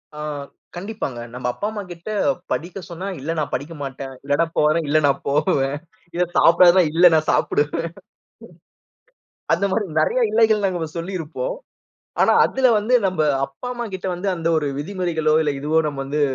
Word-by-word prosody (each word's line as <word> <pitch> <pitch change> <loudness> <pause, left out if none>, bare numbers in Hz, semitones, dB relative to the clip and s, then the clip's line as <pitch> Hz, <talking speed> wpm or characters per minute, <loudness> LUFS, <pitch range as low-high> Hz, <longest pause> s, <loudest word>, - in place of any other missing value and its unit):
ஆ - - -8 0.6
கண்டிப்பாங்க. 180 - -5
நம்ப 125 0 -4
அப்பா, 205 - -3
அம்மா 210 -1 -5
கிட்ட 170 +5 -9 0.4
படிக்க 175 +4 -3
சொன்னா, 175 +3 -6
"இல்ல, 150 +5 -3
நான் 150 - -2
படிக்க 145 +6 -3
மாட்டேன். 135 0 -6
இல்லன்னா 145 +4 +1
போறேன், 155 +1 +3
இல்ல 150 +2 +3
நான் 140 -1 +1
போவேன்." 140 -1 +1 0.4
இத 180 - +2
சாப்பிடாதன்னா, 175 +2 +6
"இல்ல 175 +2 +5
நான் 155 -1 +2
சாப்பிடுவேன்." 145 +3 0 1.7
அந்த 200 - +1
மாரி 210 +1 0
நெறைய 250 +10 +2
"இல்லைகள்" 220 -2 +3
நம்ப 175 -4 -2
சொல்லியிருப்போம். 185 - -4 0.7
ஆனா, - - +5
அதுல 265 -1 +2
வந்து 215 +5 -1
நம்ப 185 -4 -1 0.2
அப்பா, 135 - -10
அம்மா 240 -1 -4
கிட்ட 190 0 -4
வந்து 190 +3 -2
அந்த 165 0 -2
ஒரு 150 -2 -1
விதிமுறைகளோ, 160 -2 -1
இல்ல 145 -2 0
இதுவோ 155 +3 +1
நம்ப 140 -2 -5
வந்து 150 +2 -1
165 Hz, 160 wpm, -21 LUFS, 145-190 Hz, 1.7 s, சாப்பிடாதன்னா